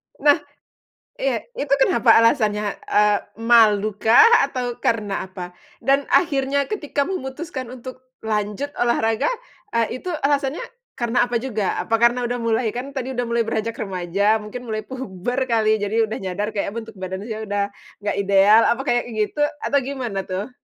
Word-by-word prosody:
Nah, 295 +2 +4 0.8
iya, - - -1
itu 280 -1 +1
kenapa 235 -4 +4
alasannya? 215 -3 +2 0.2
Eee, 210 -1 +4 0.3
malu 215 -3 +5
kah, 230 - +7 0.2
atau 245 -3 -4
karena 210 -4 -1
apa? 180 -2 -8 0.3
Dan 275 +1 +2
akhirnya 280 -4 +2
ketika 295 -8 -1
memutuskan 270 -5 -5
untuk 255 +1 -9 0.2
lanjut 210 +5 -2
olahraga, 225 - +1 0.5
eee, 230 +2 0
itu - - -7 0.2
alasannya 280 +1 +1 0.4
karena 240 0 +1
apa 235 - +1
juga, 220 -5 -2
apa 225 - -1
karena 235 +2 +3
udah 245 +1 -2
mulai 225 0 0
kan 255 +3 -5
tadi 265 -1 -4
udah 245 - -1
mulai 235 -1 0
beranjak 225 0 -2
remaja, 200 +2 0
mungkin 245 +4 -8
mulai 215 -1 -3
puber 245 -2 -5
kali 220 -2 +2
jadi 205 +3 0
udah - - -3
nyadar, 195 +3 -3
kayak 205 0 -3
bentuk 225 -2 -7
badan 190 +1 -5
saya 220 0 -5
sudah 205 0 -1 0.4
enggak 205 - -1
ideal, 200 +2 +5
apa 245 +3 +1
kayak 240 -3 +1
gitu 215 +5 -2 0.2
atau 280 - +2
gimana 255 -6 -4
tuh? 195 +6 -4
230 Hz, 155 wpm, -22 LUFS, 210-260 Hz, 0.8 s, kah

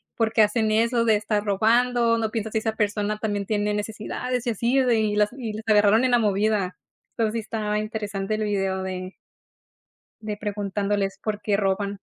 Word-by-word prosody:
¿Por 225 -2 +1
qué 220 0 +5
hacen 215 +1 +1
eso 230 +2 +2
de 220 -2 +4
estar 210 0 -1
robando? 230 +3 +2
¿No 220 -1 0
piensas 220 -1 -3
si 220 - +2
esa 220 0 -2
persona 210 -1 -1
también 205 -2 -2
tiene 210 -1 0
necesidades?". 220 +4 -3
Y - - +2
así 235 +4 0
de 245 -4 +3
y 210 -1 0
las 210 0 +3
y 230 -5 -4
las 215 +1 -6
agarraron 210 +2 +5
en 255 - +1
la 245 - +5
movida. 205 -3 +1 0.4
Entonces 220 -2 +1
sí 230 - -1
estaba 215 -1 -2
interesante 215 -1 -3
el 215 - -2
video 195 -2 -1
de 185 0 -5 1.1
de 210 -1 -4
preguntándoles 205 -1 -2
por 210 -1 -3
qué 205 -2 +1
roban. 200 0 -1
215 Hz, 190 wpm, -24 LUFS, 205-225 Hz, 1.1 s, qué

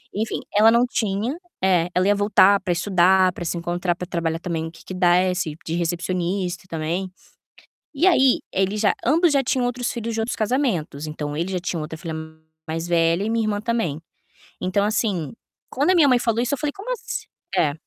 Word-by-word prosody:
Enfim, 220 +2 -2 0.2
ela 215 +2 +7
não 235 +1 +4
tinha 220 +3 -1 0.3
é, 180 -2 +3
ela 185 +1 +3
ia 205 - +5
voltar 200 -1 +5
pra 180 -2 0
estudar, 185 0 +3
pra 175 - -6
se 170 - -2
encontrar, 175 +1 -1
pra 180 - -6
trabalhar 165 -2 -2
também 165 -2 -3
no 160 - -7
que 165 - -16
que 185 - -7
desse, 180 -3 +2
de 165 - -3
recepcionista 175 +1 -2
também. 170 +4 -2 0.9
E 325 +7 +2
aí, 265 -8 +5
eles 195 +2 0
já 210 - +3
ambos 325 +6 +4
já 275 -1 +3
tinham 255 -1 +1
outros 245 0 -2
filhos 230 -2 -4
de 225 - -1
outros 225 - -2
casamentos, 210 - -1
então, 150 -1 -5
ele 175 +4 -2
já 180 - 0
tinha 175 -1 -3
outra 155 +1 -6
filha 165 -2 -5 0.5
mais 165 +2 -3
velha 170 +2 +2
e 220 - -1
minha 230 -1 +1
irmã 205 -1 -1
também. 220 -10 -1 0.6
Então, 185 +2 +1
assim, 205 - -1 0.4
quando 290 +8 +1
a - - +3
minha 310 -4 +6
mãe 250 - +5
falou 230 -1 0
isso, 255 +4 -1
eu - - -14
falei: 290 +1 -1
"Como 430 +6 -6
ass" - - -5 0.3
é, 145 -3 +3
190 Hz, 200 wpm, -22 LUFS, 170-230 Hz, 0.9 s, ela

